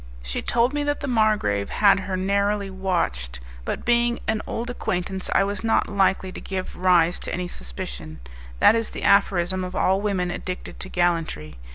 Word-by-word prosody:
She - - -3
told 240 +3 +1
me 295 0 0
that 290 0 -1
the - - -3
margrave 215 - +1
had 200 -1 +4
her 190 -1 -3
narrowly 200 +1 0
watched, 170 - -2 0.2
but - - -4
being 240 0 +3
an 220 -1 0
old 240 +2 -3
acquaintance 190 -4 -3
I - - +5
was 200 0 -3
not 225 0 +2
likely 190 -1 +1
to - - -8
give 190 -1 -5
rise 180 -2 +3
to - - -5
any 180 0 -2
suspicion; 60 - -7 0.4
that - - +6
is 225 -1 0
the - - -7
aphorism 185 -2 +3
of 180 0 -6
all 190 +1 +2
women 190 -4 0
addicted 185 +1 -6
to 190 - -7
gallantry. 165 - -1
190 Hz, 180 wpm, -24 LUFS, 175-210 Hz, 0.4 s, that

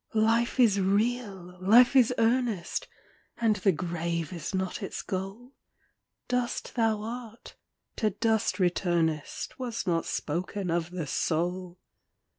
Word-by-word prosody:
Life 230 +3 +2
is 215 -5 +5
real! 195 -2 -1
Life 240 +7 +6
is 250 -2 +6
earnest! 230 -5 0 0.5
And 225 -3 +2
the 195 +1 +3
grave 170 -1 -3
is 170 -4 -5
not 190 +2 -2
its 195 - -5
goal; 195 +7 -5 0.8
Dust 250 -1 -2
thou 220 -3 +1
art, 230 0 -8 0.4
to 215 - +2
dust 220 +2 0
returnest, 175 - 0
Was 240 -3 -3
not 165 -2 0
spoken 180 +4 -2
of 170 0 0
the 175 -3 -4
soul. 175 +5 -1
195 Hz, 120 wpm, -28 LUFS, 175-230 Hz, 0.8 s, Life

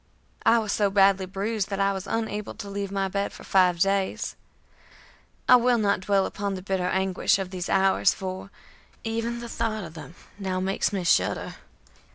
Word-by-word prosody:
I 235 - +6
was 215 -2 -1
so 205 -1 +2
badly 195 -1 +4
bruised 200 +2 -2
that 195 -1 -3
I 200 0 +2
was 190 0 -6
unable 215 -2 -3
to 200 - -8
leave 200 -1 -4
my 195 -1 0
bed 200 +1 -2
for - - -12
five 180 -2 +3
days. 195 +1 0 1.1
I 250 - +9
will 245 0 +3
not 205 -3 +2
dwell 195 0 +2
upon 200 -1 -3
the 185 - -7
bitter 190 -2 -1
anguish 190 0 +1
of 190 -2 -5
these 180 -2 -4
hours, 195 0 +3
for 190 +1 -6 0.5
even 230 +1 -2
the 235 - -6
thought 225 -2 -2
of 160 -2 -9
them 165 +1 -10 0.2
now 190 -2 -2
makes 190 +3 0
me 195 -3 -2
shudder. 170 - +1
195 Hz, 185 wpm, -26 LUFS, 190-210 Hz, 1.1 s, I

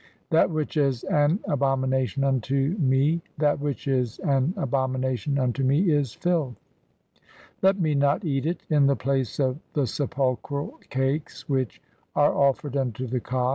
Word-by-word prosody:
That 165 +2 +4
which 155 -1 -2
is 135 -5 +1
an 145 +4 +2
abo 135 -1 +1
"mination 130 0 0
unto 135 - 0
me, 140 +2 +3
(2) - - -8 0.2
that 145 -1 +2
which 145 -3 -3
is 125 -4 0
an 140 0 +2
abomination 130 - -1
unto 130 0 0
me 150 +7 +3
"is 145 -5 +1
filth; 160 -8 0 1.1
let 195 +1 +3
me 155 -4 +1
not 140 +7 +2
eat 140 -1 0
it 175 - -2
[in 145 -3 +4
the 140 - +3
place 135 -2 -1
of] 130 0 +1
the 145 -3 +1
sepulchral 140 - -2
cakes 135 +3 -2
"[which 130 - -2 0.3
are 145 0 +4
offered 140 0 +1
unto] 130 -2 -1
the 125 +1 -2
Kas. 125 +1 -1
140 Hz, 160 wpm, -25 LUFS, 130-150 Hz, 1.1 s, That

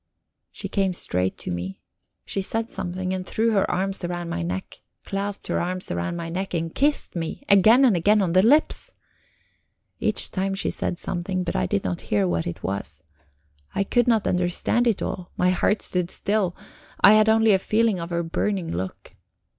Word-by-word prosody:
She - - -6
came 195 -3 0
straight 90 - -2
to - - -5
me. 90 +2 -5 0.5
She 195 - -2
said 225 +4 -2
something, 185 +1 -3
and 185 0 -3
threw 225 +4 0
her 200 -3 +2
arms 195 +1 -1
round 175 -1 -3
my - - -2
neck; 90 +2 -5 0.2
clasped 200 +1 -4
her - - -1
arms 185 +1 -2
round 85 - -2
my 170 -1 -4
neck 185 +2 -3
and 165 0 -2
kissed 290 -5 0
me 165 +10 -4
again 220 +7 +6
and 230 -7 +4
again 205 +5 +3
on 180 -4 +1
the 185 - +6
lips. 285 +9 +3 1.1
Each - - 0
time 195 0 -1
she 195 - 0
said 175 - -2
something, 185 +1 -2
but 180 - -3
I 90 - +1
did 100 - -1
not 90 -2 -3
hear 100 -2 +2
what 85 -2 -1
it 85 - -6
was. 80 -6 -4 0.7
I 200 - +2
could 240 +4 +1
not 225 -3 +3
understand 180 +7 +1
it 220 -4 +1
all; 180 -1 -4
my 180 0 +3
heart 200 +3 +1
stood 180 -1 -1
still; 200 -3 0 0.5
I 200 - +9
had 215 0 +5
only 220 -1 +5
a 190 - +4
feeling 215 -1 +1
of 170 0 -5
her 170 -1 -1
burning 170 - -2
look. 95 +1 -6
185 Hz, 190 wpm, -24 LUFS, 170-205 Hz, 1.1 s, I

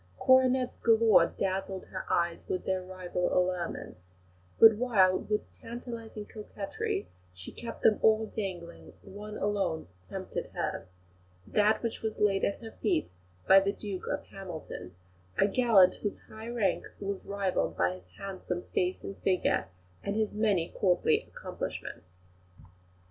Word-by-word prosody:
Coronets 260 -1 +4
galore 225 -6 +5
dazzled 190 0 -3
her 185 - -6
eyes 170 -1 +1
with 185 - -2
their 190 -1 0
rival 180 -1 -3
allurements; 180 - -1 0.6
but 225 -1 +10
while, 205 -6 +4
with 210 0 -2
tantalising 230 -2 -7
coquetry, 205 - -4 0.3
she 90 0 -8
kept 235 - -8
them 215 - +5
all 220 0 +4
dangling, 185 -6 -6
one 210 +2 -8
alone 195 - -1
tempted 90 - -5
her - - -2 0.6
that 215 +2 +2
which 230 - -3
was 220 -1 -3
laid 200 -2 +3
at 200 - -1
her 225 - -7
feet 175 - 0 0.4
by 195 - +9
the 195 +1 +1
Duke 200 -2 -6
of - - -2
Hamilton, 160 - -8 0.4
a - - +5
gallant 200 -5 +5
whose 205 - -4
high 220 +1 -9
rank 235 -5 +1 0.2
was 200 -1 -4
rivalled 200 -2 -1
by 90 +1 +2
his 90 0 -13
handsome 185 -2 -4
face 180 +1 0
and 195 - -7
figure, 185 -1 +1 0.3
and 200 - -2
his 215 -1 +1
many 205 -6 +1
courtly 180 -3 +2
accomplishments. 90 - -6
195 Hz, 140 wpm, -30 LUFS, 180-220 Hz, 0.6 s, but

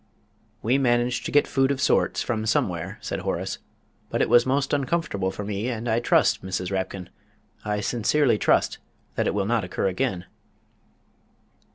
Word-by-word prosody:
"We 125 +5 +2
managed 120 -1 +1
to - - -5
get 145 - +4
food 135 -1 +1
of 140 -2 -1
sorts 140 - +2
from 110 -2 -2
somewhere," 95 -1 -1
said - - -3
Horace, - - -3 0.5
"but - - -1
it - - +2
was 120 +1 +5
most 135 +2 0
uncomfortable 135 - 0
for 100 +2 -6
me, 105 +2 -3
and 120 -1 -4
I 115 0 +2
trust, 120 - +2
Mrs. 95 0 -3
Rapkin 95 -1 -3 0.6
I 105 -1 -1
sincerely 120 +1 +2
trust - - +2 0.3
that - - 0
it - - 0
will 100 -1 0
not 115 0 +1
occur 90 +2 -1
again." 95 -2 -1
115 Hz, 165 wpm, -25 LUFS, 100-130 Hz, 0.6 s, was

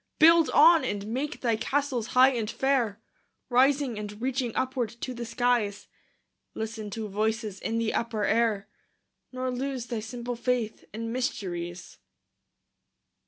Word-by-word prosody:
Build 330 0 +6
on, 330 +1 +7
and 205 0 -2
make 260 +7 -3
thy 235 -3 +2
castles 255 0 -1
high 260 +1 +8
and 230 -4 -2
fair, 235 -3 0 0.5
Rising 265 -2 +3
and 210 0 -7
reaching 255 0 -1
upward 255 -3 -1
to 255 - -3
the 235 -1 -6
skies; 235 -4 0 0.7
Listen 220 -1 -4
to 220 +1 -4
voices 215 0 -2
in 225 - -2
the 230 -1 0
upper 230 -2 -1
air, 215 -2 +1 0.6
Nor 255 0 -2
lose 255 -1 -3
thy 235 -3 -3
simple 240 +2 -5
faith 240 -2 -2
in 230 +1 -5
mysteries. 180 -8 -4
235 Hz, 135 wpm, -27 LUFS, 215-255 Hz, 0.7 s, high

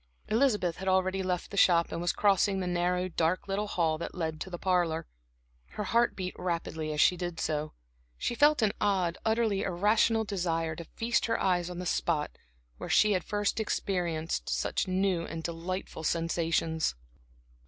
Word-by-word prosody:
Elizabeth 215 -7 +2
had 190 - -6
already 190 0 +2
left 180 -1 -2
the 200 - -6
shop, 170 -3 +4
and 170 - -3
was 175 - +1
crossing 200 -1 +2
the 185 - -2
narrow, 180 +1 0
dark 170 +1 0
little 200 +2 -1
hall 165 -5 0
that - - -6
led 160 -3 -3
to - - -4
the 175 - -5
parlor. 175 -3 +1 0.7
Her 210 - -3
heart 235 +4 +2
beat 185 -1 -4
rapidly 165 -3 -3
as 150 - -3
she 180 - +5
did 175 -1 -4
so. 155 0 -2 0.4
She - - -1
felt 290 0 +4
an 210 - +3
odd, 185 -4 +1
utterly 220 -3 +1
irrational 210 +4 +2
desire 165 -6 -1
to 170 - -7
feast 230 +6 -1
her 230 - 0
eyes 180 -2 +1
on 180 - -7
the 180 - -5
spot 160 -3 0 0.5
where - - -7
she 215 - +5
had 185 -2 +1
first 205 +1 -1
experienced 175 -6 -2
such - - -1
new 185 -2 +1
and 165 0 -6
delightful 170 0 -4
sensations. 165 - 0
180 Hz, 175 wpm, -29 LUFS, 165-200 Hz, 0.7 s, she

